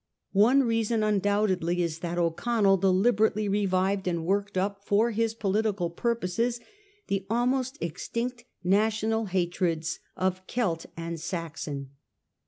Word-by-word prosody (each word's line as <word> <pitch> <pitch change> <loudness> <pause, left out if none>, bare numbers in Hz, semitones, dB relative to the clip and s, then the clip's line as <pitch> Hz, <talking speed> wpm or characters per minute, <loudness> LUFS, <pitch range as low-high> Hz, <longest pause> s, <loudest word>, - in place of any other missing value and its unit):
One 240 +8 +5
reason 225 -2 +1
undoubtedly 200 -4 +1
is 165 -1 -3
that 175 0 -3
O'Connell 195 +4 +2
deliberately 205 +3 +2
revived 195 -1 +1
and 170 -2 -1
worked 200 +1 0
up 200 +1 -1
for 215 +4 +2
his 225 0 0
political, 200 -4 0
purposes 235 +3 -1 0.5
the 195 -1 -2
almost 255 +4 0
extinct 235 +9 -4 0.2
national 220 +3 +2
hatreds 175 -3 -1 0.2
of 185 0 0
Celt 180 -10 -1
and 165 0 -4
Saxon. 155 -5 -5
200 Hz, 115 wpm, -27 LUFS, 175-225 Hz, 0.5 s, One